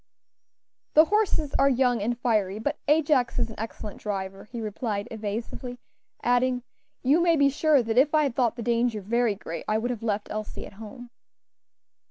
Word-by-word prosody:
"The 310 Hz, +1 st, +8 dB
horses 370 Hz, -7 st, +1 dB
are 275 Hz, 0 st, +5 dB
young 250 Hz, -3 st, +2 dB
and 235 Hz, +3 st, -1 dB
fiery, 210 Hz, -5 st, 0 dB
but 285 Hz, +7 st, -2 dB
Ajax 290 Hz, -4 st, +3 dB
is -, -, 0 dB
an -, -, -11 dB
excellent 215 Hz, -1 st, -6 dB
driver," 195 Hz, -2 st, -4 dB
he 235 Hz, +2 st, -7 dB
replied, 210 Hz, -1 st, -3 dB
evasively; 225 Hz, +3 st, -5 dB, 0.5 s
adding, 245 Hz, 0 st, +2 dB, 0.4 s
"You 285 Hz, +6 st, +4 dB
may 340 Hz, -1 st, +4 dB
be 280 Hz, -2 st, +4 dB
sure 290 Hz, -2 st, +3 dB
that 225 Hz, +2 st, +2 dB
if 295 Hz, +3 st, +3 dB
I 305 Hz, -, +4 dB
had 275 Hz, -4 st, 0 dB
thought 240 Hz, -3 st, +1 dB
the 235 Hz, -, -5 dB
danger 235 Hz, -1 st, +1 dB
very 225 Hz, +2 st, +1 dB
great 170 Hz, -4 st, -6 dB
I 215 Hz, -, +2 dB
would 240 Hz, +3 st, -1 dB
have 235 Hz, -3 st, -5 dB
left 210 Hz, -2 st, -2 dB
Elsie 215 Hz, 0 st, -5 dB
at -, -, -12 dB
home." 240 Hz, +3 st, -10 dB
240 Hz, 180 wpm, -26 LUFS, 215-270 Hz, 0.5 s, The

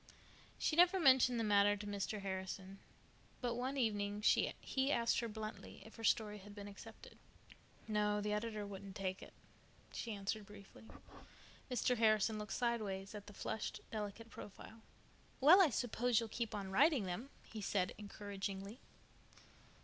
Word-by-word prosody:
She 305 Hz, -, +1 dB
never 360 Hz, +3 st, +6 dB
mentioned 260 Hz, -5 st, +6 dB
the -, -, +1 dB
matter 205 Hz, -1 st, +4 dB
to 205 Hz, -, -7 dB
Mr. 205 Hz, +1 st, -3 dB
Harrison, 190 Hz, 0 st, -5 dB, 0.6 s
but 245 Hz, -2 st, -1 dB
one 255 Hz, +3 st, -2 dB
evening 205 Hz, -4 st, 0 dB
he 265 Hz, +5 st, +2 dB
asked 235 Hz, -3 st, +2 dB
her 235 Hz, -, -2 dB
bluntly 215 Hz, 0 st, -7 dB
if 220 Hz, -, -12 dB
her 225 Hz, -, -8 dB
story 210 Hz, -2 st, +2 dB
had 205 Hz, +1 st, -12 dB
been 205 Hz, -1 st, -7 dB
accepted. 200 Hz, -, -12 dB, 0.7 s
"No, 210 Hz, -1 st, +1 dB
the 210 Hz, 0 st, -1 dB
editor 210 Hz, -1 st, -2 dB
wouldn't 195 Hz, -1 st, -8 dB
take 190 Hz, -2 st, -3 dB
it," -, -, -10 dB, 0.6 s
she 225 Hz, -3 st, -4 dB
answered 200 Hz, +1 st, -3 dB
briefly. 205 Hz, +1 st, -13 dB, 0.8 s
Mr. 250 Hz, 0 st, +1 dB
Harrison 215 Hz, -1 st, +3 dB
looked 210 Hz, -1 st, -5 dB
sidewise 210 Hz, -5 st, -1 dB
at 205 Hz, -1 st, -8 dB
the 205 Hz, -, -10 dB
flushed, 215 Hz, -, -4 dB
delicate 215 Hz, +1 st, -5 dB
profile. 220 Hz, +2 st, -10 dB, 0.6 s
"Well, 325 Hz, +8 st, +9 dB
I 350 Hz, -, +6 dB
suppose 245 Hz, -1 st, +1 dB
you'll 230 Hz, -1 st, -4 dB
keep 230 Hz, -1 st, -3 dB
on 195 Hz, -2 st, -4 dB
writing 280 Hz, -, +4 dB
them," 185 Hz, +9 st, -4 dB
he 220 Hz, -, -8 dB
said 190 Hz, -2 st, 0 dB
encouragingly. 200 Hz, +1 st, -5 dB
210 Hz, 150 wpm, -38 LUFS, 200-235 Hz, 0.8 s, Well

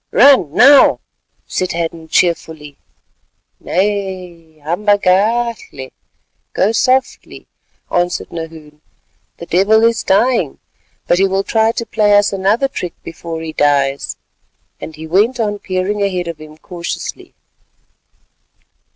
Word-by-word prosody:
"Run 260 Hz, -, +5 dB
now," 275 Hz, +2 st, +6 dB, 0.5 s
said 185 Hz, -, -3 dB
Hadden 165 Hz, -1 st, -4 dB
cheerfully. 160 Hz, -4 st, -1 dB, 0.8 s
"Nay, 185 Hz, -4 st, -3 dB
hamba 180 Hz, +8 st, 0 dB
gachle—go 205 Hz, -, -2 dB
softly—" 255 Hz, +3 st, -1 dB, 0.5 s
answered 175 Hz, 0 st, -1 dB
Nahoon, 160 Hz, -2 st, -9 dB, 0.6 s
"the 170 Hz, -, -9 dB
devil 200 Hz, +6 st, +3 dB
is 230 Hz, 0 st, +2 dB
dying, 195 Hz, -, +1 dB, 0.5 s
but 175 Hz, -, +2 dB
he 195 Hz, -, +4 dB
will 195 Hz, +1 st, -1 dB
try 220 Hz, +2 st, +1 dB
to 235 Hz, -, -4 dB
play 210 Hz, -2 st, +3 dB
us 205 Hz, 0 st, +2 dB
another 200 Hz, +7 st, +1 dB
trick 180 Hz, -10 st, -6 dB
before 165 Hz, 0 st, -7 dB
he 160 Hz, -1 st, -6 dB
dies." 140 Hz, -2 st, 0 dB, 0.6 s
And 160 Hz, -, -9 dB
he 160 Hz, -, -9 dB
went 210 Hz, +10 st, +1 dB
on 205 Hz, -2 st, -1 dB
peering 190 Hz, +2 st, -2 dB
ahead 185 Hz, -3 st, -1 dB
of 165 Hz, -2 st, -6 dB
him 155 Hz, 0 st, -13 dB
cautiously. 170 Hz, +1 st, -7 dB
185 Hz, 115 wpm, -16 LUFS, 165-210 Hz, 0.8 s, now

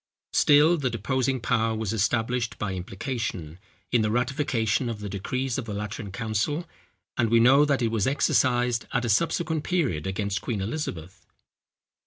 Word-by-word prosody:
Still 150 Hz, +4 st, +5 dB
the 135 Hz, -4 st, 0 dB
deposing 130 Hz, +2 st, -1 dB
power 115 Hz, -1 st, +1 dB
was 110 Hz, -1 st, -2 dB
established 115 Hz, +2 st, 0 dB
by 100 Hz, -2 st, -3 dB
implication, 95 Hz, -, -4 dB, 0.3 s
in 120 Hz, -, +3 dB
the 105 Hz, -, +1 dB
ratification 125 Hz, -1 st, 0 dB
of 115 Hz, -2 st, -5 dB
the 105 Hz, -, -5 dB
decrees 125 Hz, +7 st, -2 dB
of 125 Hz, -, -5 dB
the 105 Hz, -3 st, -5 dB
Lateran 105 Hz, 0 st, -5 dB
council; 115 Hz, -, -2 dB, 0.5 s
and 115 Hz, -, +3 dB
we 115 Hz, +1 st, +5 dB
know 135 Hz, +5 st, +6 dB
that 140 Hz, -4 st, +1 dB
it 115 Hz, -, +2 dB
was 110 Hz, -3 st, +1 dB
exercised 125 Hz, -3 st, +2 dB
at 125 Hz, -2 st, +1 dB
a -, -, -1 dB
subsequent 160 Hz, -, +1 dB
period 135 Hz, -, 0 dB
against 100 Hz, +1 st, -2 dB
Queen 115 Hz, -5 st, -3 dB
Elizabeth. 95 Hz, -, -5 dB
115 Hz, 160 wpm, -26 LUFS, 105-130 Hz, 0.5 s, know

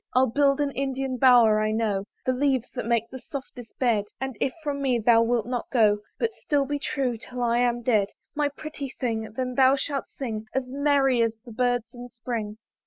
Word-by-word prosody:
I'll 255 Hz, +1 st, +6 dB
build 280 Hz, +1 st, +3 dB
an 290 Hz, -1 st, +1 dB
Indian 270 Hz, -1 st, -2 dB
bower; 235 Hz, -4 st, +6 dB
I 215 Hz, -, +1 dB
know 215 Hz, -3 st, 0 dB, 0.2 s
The 255 Hz, -, +2 dB
leaves 260 Hz, -2 st, 0 dB
that 245 Hz, -3 st, -5 dB
make 230 Hz, -1 st, +1 dB
the 260 Hz, -, -7 dB
softest 250 Hz, -4 st, -9 dB
bed: 230 Hz, -5 st, +2 dB
And 265 Hz, -2 st, -4 dB
if 265 Hz, -, +1 dB
from 285 Hz, -2 st, -2 dB
me 260 Hz, -3 st, +2 dB
thou 230 Hz, 0 st, +5 dB
wilt 230 Hz, -1 st, +1 dB
not 245 Hz, 0 st, -3 dB
go, 215 Hz, -4 st, +3 dB, 0.2 s
But 460 Hz, -1 st, -1 dB
still 285 Hz, -7 st, 0 dB
be 290 Hz, +1 st, -2 dB
true 260 Hz, -4 st, -1 dB
'till 245 Hz, +2 st, -6 dB
I 235 Hz, 0 st, +2 dB
am 240 Hz, -1 st, +1 dB
dead, 215 Hz, -5 st, +3 dB, 0.3 s
My 295 Hz, -1 st, +1 dB
pretty 285 Hz, -2 st, -7 dB
thing! 225 Hz, -4 st, -2 dB
then 255 Hz, +1 st, -3 dB
thou 260 Hz, +1 st, +5 dB
shalt 275 Hz, 0 st, -3 dB
sing, 220 Hz, -5 st, -5 dB
As 265 Hz, -1 st, 0 dB
merry 275 Hz, -2 st, +2 dB
as 230 Hz, -1 st, +2 dB
the 240 Hz, -, -10 dB
birds 245 Hz, 0 st, 0 dB
in 245 Hz, 0 st, -9 dB
spring. 230 Hz, -3 st, -5 dB
250 Hz, 205 wpm, -26 LUFS, 230-270 Hz, 0.3 s, I'll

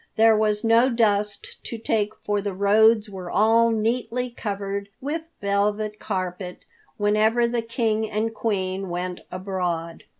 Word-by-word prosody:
There 225 Hz, 0 st, +6 dB
was 210 Hz, -1 st, +1 dB
no 230 Hz, +3 st, +5 dB
dust 210 Hz, -4 st, 0 dB
to 230 Hz, -, -4 dB
take 215 Hz, -1 st, -1 dB
for 205 Hz, -1 st, 0 dB
the 200 Hz, -2 st, -4 dB
roads 215 Hz, +3 st, +4 dB
were 190 Hz, -3 st, -7 dB
all 225 Hz, +5 st, +4 dB
neatly 235 Hz, +2 st, -1 dB
covered 200 Hz, -2 st, -4 dB
with 300 Hz, +5 st, -3 dB, 0.2 s
velvet 205 Hz, +1 st, 0 dB
carpet 185 Hz, -2 st, -4 dB, 0.3 s
whenever 215 Hz, +3 st, +3 dB
the 235 Hz, 0 st, -1 dB
King 225 Hz, -1 st, -1 dB
and 220 Hz, +2 st, -1 dB
Queen 190 Hz, -4 st, -2 dB
went 180 Hz, +1 st, -4 dB
abroad. 180 Hz, -3 st, -3 dB
210 Hz, 135 wpm, -24 LUFS, 195-225 Hz, 0.3 s, There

